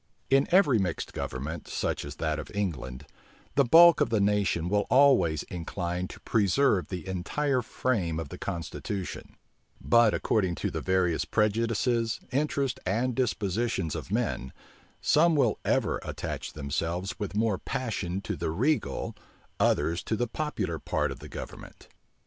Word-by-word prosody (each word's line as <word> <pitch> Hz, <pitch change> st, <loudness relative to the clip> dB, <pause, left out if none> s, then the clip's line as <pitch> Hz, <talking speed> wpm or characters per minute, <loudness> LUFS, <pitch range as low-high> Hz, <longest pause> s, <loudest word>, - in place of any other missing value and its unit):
In 135 Hz, +1 st, +4 dB
every 160 Hz, -, +5 dB
mixed 90 Hz, -4 st, -2 dB
government, 75 Hz, +6 st, -5 dB
such -, -, -2 dB
as 70 Hz, 0 st, -7 dB
that 80 Hz, -1 st, -1 dB
of -, -, -7 dB
England, 70 Hz, -9 st, -3 dB, 0.5 s
the 140 Hz, -, +4 dB
bulk 170 Hz, +6 st, +7 dB
of -, -, +3 dB
the 110 Hz, -, +2 dB
nation 100 Hz, -4 st, +1 dB
will 105 Hz, +2 st, +1 dB
always 125 Hz, -, +4 dB
incline 90 Hz, +1 st, -4 dB
to -, -, -11 dB
preserve 105 Hz, -1 st, +2 dB
the 90 Hz, -3 st, -6 dB
entire 125 Hz, +9 st, 0 dB
frame 100 Hz, -9 st, -1 dB
of 80 Hz, -4 st, -5 dB
the -, -, -9 dB
constitution; 95 Hz, +2 st, -5 dB, 0.4 s
but 115 Hz, -2 st, +4 dB
according 95 Hz, -5 st, +1 dB
to -, -, -2 dB
the -, -, -3 dB
various 90 Hz, -4 st, +1 dB
prejudices, 115 Hz, +4 st, +1 dB
interests, 140 Hz, -1 st, 0 dB
and 115 Hz, +7 st, 0 dB
dispositions 110 Hz, -, -1 dB
of -, -, -6 dB
men, 65 Hz, +1 st, -1 dB, 0.5 s
some 165 Hz, +2 st, +4 dB
will 125 Hz, -7 st, +2 dB
ever -, -, +1 dB
attach -, -, -5 dB
themselves 85 Hz, +6 st, -3 dB
with 105 Hz, -1 st, -3 dB
more 110 Hz, -3 st, +1 dB
passion 105 Hz, -8 st, -3 dB
to -, -, -3 dB
the -, -, -2 dB
regal, 115 Hz, -, 0 dB, 0.4 s
others 85 Hz, +2 st, +2 dB
to 110 Hz, -, 0 dB
the 120 Hz, -, 0 dB
popular 110 Hz, -, -3 dB
part 75 Hz, 0 st, -1 dB
of 70 Hz, -, -7 dB
the 75 Hz, +1 st, -10 dB
government. -, -, -9 dB
100 Hz, 150 wpm, -28 LUFS, 85-120 Hz, 0.5 s, bulk